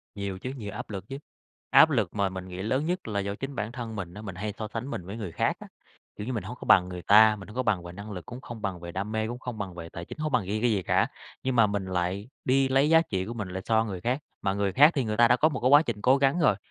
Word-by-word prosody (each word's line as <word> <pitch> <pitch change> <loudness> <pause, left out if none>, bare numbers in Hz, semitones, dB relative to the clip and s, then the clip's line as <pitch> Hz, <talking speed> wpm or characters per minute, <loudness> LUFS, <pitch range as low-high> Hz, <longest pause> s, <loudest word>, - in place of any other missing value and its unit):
Nhiều 100 -2 -4
chứ, 130 - -5
nhiều 105 -3 -6
áp 105 - -7
lực 95 -3 -6
chứ, 135 - -5 0.5
áp 160 - +7
lực 110 - 0
mà 100 -2 +1
mình 95 0 -7
nghĩ 90 0 -6
lớn 130 +9 0
nhất 180 -3 -2
là 100 -2 -1
do 100 +1 -3
chính 135 +3 -6
bản 110 0 -3
thân 120 -2 -6
mình 90 -4 -5
á, 105 - -9
mình 95 -4 -7
hay 105 +2 -4
so 110 - -4
sánh 115 +4 -5
mình 90 - -5
với 100 +4 -7
người 100 -7 -5
khác - - 0
á, - - -10 0.5
kiểu 105 - -6
như - - -1
là, 125 - -3
mình 110 - -3
hông 125 - -7
có - - -8
bằng 90 -1 +5
người 90 -1 -6
ta, 110 +4 +6
mình 95 -3 -11
hông 105 - -12
có 130 - 0
bằng 95 -7 +1
về 85 - -8
năng 100 +4 -9
lực, 90 -5 -7
cũng 125 +6 -9
không 120 -4 -9
bằng 95 -3 -3
về 85 0 -7
đam 100 +4 -4
mê, 110 0 -1
cũng 120 +1 -5
không 125 -3 -6
bằng 100 -3 -5
về 85 -1 -8
tài 85 +1 -8
chính, - - -9
hông 155 0 -2
có 125 - +4
bằng 100 - -7
riêng 105 +2 -2
cái 120 0 +3
gì 100 -4 0
cả. - - +2 0.4
Nhưng 130 -1 0
mà 115 -2 +6
mình 100 -2 -2
lại 95 +3 -2 0.2
đi 135 +1 +3
lấy 135 +3 +3
giá 165 0 +6
trị 95 - -3
của 115 - -5
mình 105 -5 -5
lại 95 +1 -5
so 110 -1 +3
người 95 -5 -5
khác, 125 +8 0 0.2
mà 95 - 0
người 100 -1 -1
khác 150 - +7
thì 135 - 0
người 105 -2 -2
ta 120 0 +7
đã 120 - +5
có 155 +4 +3
một - - -4
cái 125 - +2
quá 145 +1 +8
trình 120 -9 -4
cố 130 +5 +5
gắng 140 +4 +2
rồi, 125 - +4
105 Hz, 335 wpm, -27 LUFS, 95-125 Hz, 0.5 s, quá